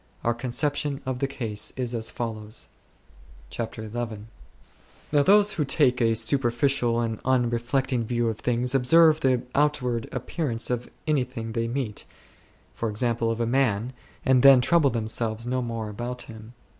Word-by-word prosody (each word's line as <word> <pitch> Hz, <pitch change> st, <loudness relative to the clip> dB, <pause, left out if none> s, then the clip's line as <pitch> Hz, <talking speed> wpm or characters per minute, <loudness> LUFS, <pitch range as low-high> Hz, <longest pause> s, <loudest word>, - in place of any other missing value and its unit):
Our 120 Hz, -, +2 dB
conception 140 Hz, +4 st, -1 dB
of 130 Hz, -1 st, -3 dB
the 140 Hz, -, 0 dB
case 110 Hz, -6 st, -3 dB
is 125 Hz, -2 st, -2 dB
as 115 Hz, -1 st, -1 dB
follows. 110 Hz, -1 st, -5 dB, 0.4 s
/ -, -, -24 dB
CHAPTER 110 Hz, -1 st, -5 dB
XL 115 Hz, 0 st, -4 dB, 1.0 s
Now 145 Hz, -1 st, +4 dB
those 205 Hz, +6 st, +5 dB
who 155 Hz, -, 0 dB
take 130 Hz, -3 st, +2 dB
a 115 Hz, -1 st, +3 dB
superficial 120 Hz, +1 st, +1 dB
and 115 Hz, -2 st, -2 dB
unre 120 Hz, -2 st, +1 dB
flecting 130 Hz, 0 st, 0 dB
view 120 Hz, +1 st, -1 dB
of 110 Hz, -1 st, -3 dB
things 125 Hz, +1 st, 0 dB
observe 155 Hz, +4 st, +5 dB
the 130 Hz, -4 st, +1 dB
outward 130 Hz, -6 st, 0 dB
appearance 125 Hz, -9 st, -2 dB
of 125 Hz, 0 st, -3 dB, 0.2 s
anything 125 Hz, -6 st, -2 dB
they 115 Hz, 0 st, -1 dB
meet, 120 Hz, -4 st, -4 dB, 0.8 s
e.g. 110 Hz, +2 st, -1 dB
of 115 Hz, -1 st, 0 dB
a 115 Hz, -, +1 dB
man, 120 Hz, -2 st, 0 dB, 0.3 s
and 130 Hz, -2 st, +4 dB
then 135 Hz, -1 st, +8 dB
trouble 150 Hz, +3 st, +3 dB
themselves 110 Hz, -1 st, -2 dB
no 125 Hz, +1 st, -1 dB
more 115 Hz, -3 st, -4 dB
about 120 Hz, +4 st, -5 dB
him. 110 Hz, +1 st, -12 dB
120 Hz, 155 wpm, -25 LUFS, 115-135 Hz, 1.0 s, then